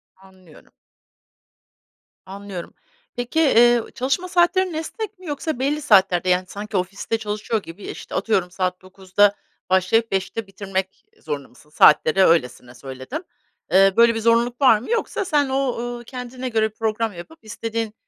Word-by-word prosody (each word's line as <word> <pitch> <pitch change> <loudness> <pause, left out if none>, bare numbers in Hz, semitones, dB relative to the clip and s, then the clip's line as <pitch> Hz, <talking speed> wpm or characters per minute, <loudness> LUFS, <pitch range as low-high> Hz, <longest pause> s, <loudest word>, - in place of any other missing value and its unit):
Anlıyorum. 190 -4 -20 1.5
Anlıyorum. 195 -2 -8 0.4
Peki, 245 +6 -2
eee, 240 -5 +5
çalışma 275 +8 -1
saatlerin 360 +1 +2
esnek 390 +6 -6
mi 370 - -14
yoksa 295 -2 -4
belli 290 +3 0
saatlerde 190 -8 +3
yani 180 0 +2
sanki 205 +1 -5
ofiste 195 +5 -2
çalışıyor 215 0 -3
gibi, 165 +5 -11
işte, - - -8
atıyorum, 190 -4 0
saat 185 0 -2
09.00'da 190 +2 +1 0.3
başlayıp 190 +5 +2
17.00'te 195 +3 -2
bitirmek 190 -1 -5 0.2
zorunda 145 -3 -5
mısın? 150 +4 -22
Saatleri 155 +4 +5
öylesine 125 -6 0
söyledim. 130 - -7 0.5
Eee, 195 +1 +5
böyle 235 0 +5
bir - - -1
zorunluluk 235 +3 +1
var 240 -5 +6
mı 240 - -10
yoksa 455 -3 -1
sen 290 -5 +1
o, 265 -2 -1
ııı, 240 0 -5
kendine 250 +1 -7
göre 220 -1 +1
program 220 0 -2
yapıp 250 - -11
istediğin, 225 0 -4
220 Hz, 145 wpm, -22 LUFS, 190-255 Hz, 1.5 s, var